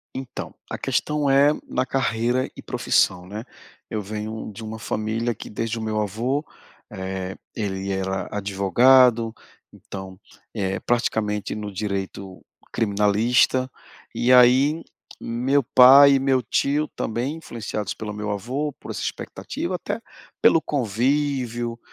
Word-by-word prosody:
Então, 130 -1 -6 0.2
a - - -4
questão 150 -1 -1
é 140 +2 +5 0.2
na 130 +1 -1
carreira 125 -1 0
e - - -9
profissão, 90 -1 +1
né. 105 +3 -6 0.5
Eu 110 - -2
venho 110 +2 -5
de 110 +3 -9
uma 110 0 -6
família 110 +2 -2
que - - -10
desde 115 +1 -3
o - - -5
meu 110 -1 -1
avô 120 +8 -1 0.5
eh, 95 0 -5 0.2
ele 100 -2 -3
era 95 0 -2
advogado, 115 +4 +4 0.4
então, 95 -1 -9 0.3
eh, 95 -3 -2
praticamente 110 -4 -1
no 105 -1 -5
direito 95 -1 -5 0.3
criminalista 110 +5 +2 0.4
e 120 - +1
aí 130 +5 +5 0.4
meu 130 +4 0
pai 135 +3 +8
e - - +3
meu 135 -1 +2
tio, 145 +7 0
também 120 +7 -2
influenciados 110 - -5
pelo 105 -1 -6
meu 105 0 -4
avô, 130 +9 -2
por - - -8
essa - - -5
expectativa, - - -4
até - - -4 0.4
pelo 165 - +6
convívio, 125 -1 -1
115 Hz, 130 wpm, -23 LUFS, 105-130 Hz, 0.5 s, pai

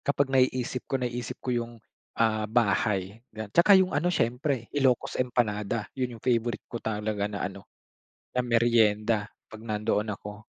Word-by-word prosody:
kapag 140 -1 0
naiisip 130 -1 +1
ko, 135 - +1
naisip 125 -1 -4
ko 125 - 0
yung, 120 -1 -2 0.4
ah, 110 -2 +1
bahay 105 -2 +1
ga 110 -1 -8
'tsaka 190 +3 +7
yung 185 -1 +3
ano 155 +5 +1
siyempre, 125 -4 0
Ilocos 130 -3 +1
Empanada. 110 -3 -1
Yun 125 -3 -3
yung 110 - -18
favorite 120 -1 0
ko 120 - -4
talaga 105 -1 -2
na 100 -1 -4
ano, 100 0 -7 0.6
na 125 - -1
meryenda 115 -3 +2 0.2
'pag 110 - -9
nandoon 110 -1 -1
ako. 105 +1 -10
115 Hz, 155 wpm, -27 LUFS, 105-125 Hz, 0.6 s, tsaka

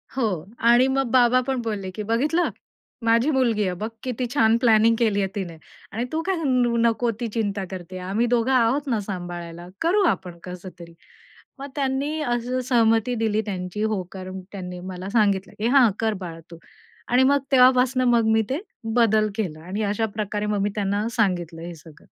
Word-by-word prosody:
हो 260 - +1 0.4
आणि 245 +2 +6
मग 270 -2 0
बाबा 250 0 +5
पण 265 -2 -1
बोलले 210 -4 -4
की 210 +3 -6
"बघितलं? 290 +11 +1 0.6
माझी 230 +5 +3
मुलगी 235 -6 +2
आहे. 185 -2 -1
बघ 215 +3 -3
किती 250 -1 -2
छान 225 -5 +4
प्लॅनिंग 230 -1 +4
केली 215 -4 +2
आहे 195 - +1
तिने 180 -5 -5 0.3
आणि 230 +4 -2
तू 320 +1 -1
काय 385 0 +1
न 250 -3 +2
नको 235 +1 +1
ती 235 - -2
चिंता 205 -3 -1
करते 185 0 -7
आम्ही 220 +5 +1
दोघं 240 +1 +1
आहोत 260 +3 +2
ना 230 -4 +1
सांभाळायला, 175 -2 -6
करू 385 +5 +3
आपण 175 - -2
कसतरी." 180 -2 -10 0.7
मग 275 - -6
त्यांनी 280 +2 -1
असं 245 -1 -1
सहमती 230 0 +3
दिली 220 -1 0
त्यांची, 185 0 -4
होकार 190 -3 -3 0.2
त्यांनी 180 -2 -7
मला 185 +1 -7
सांगितलं 200 -4 +1
की 220 - 0
"हां, 255 -2 +6
कर 225 -1 +1
बाळा 165 -2 -7
तू" 170 - -9 0.5
आणि 250 +2 +4
मग 280 +2 +4
तेव्हापासून 255 0 +5
मग 235 -2 +3
मी 220 - +4
ते 275 +5 -1 0.3
बदल 220 -3 +3
केला 180 -9 -3
आणि 200 +4 -3
अशा 210 +2 0
प्रकारे 210 -1 -2
मग 210 -1 0
मी 205 - +1
त्यांना 205 +1 -1
सांगितलं 175 -6 0
हे 170 +1 -7
सगळं. 155 -1 -16
225 Hz, 180 wpm, -23 LUFS, 190-250 Hz, 0.7 s, आणि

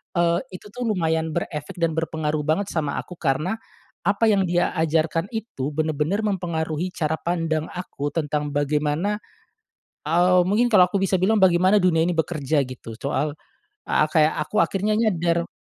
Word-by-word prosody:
eee, 170 0 +3 0.2
itu 210 - -11
tuh 250 +2 -5
lumayan 160 -5 0
berefek 150 0 -4
dan 165 -1 +2
berpengaruh 155 -2 -1
banget 160 +7 0
sama 150 -4 -1
aku 180 - -8
karena, 155 +8 0 0.5
apa 200 +4 +2
yang 200 -3 +3
dia 175 0 0
ajarkan 165 +3 0
itu 205 - -4
bener-bener 155 +5 -1
mempengaruhi 170 -3 -2
cara 160 -2 -1
pandang 165 -2 -1
aku 145 -5 -5
tentang 150 -2 -2
bagaimana, 150 +7 0 0.9
eee, 180 +3 +4
mungkin 210 +6 +2
kalo 185 -3 +7
aku 200 - +1
bisa 195 0 +2
bilang 200 +4 +2
bagaimana 185 +2 +5
dunia 165 -3 +3
ini 180 - +1
bekerja 155 -2 0
gitu 115 -3 -9
soal, 140 +2 -1 0.6
eee, 155 - +3
kayak 155 -1 +4
aku 215 - +2
akhirnya 205 +2 0
nyadar. 170 -6 +1
165 Hz, 155 wpm, -23 LUFS, 155-185 Hz, 0.9 s, kalo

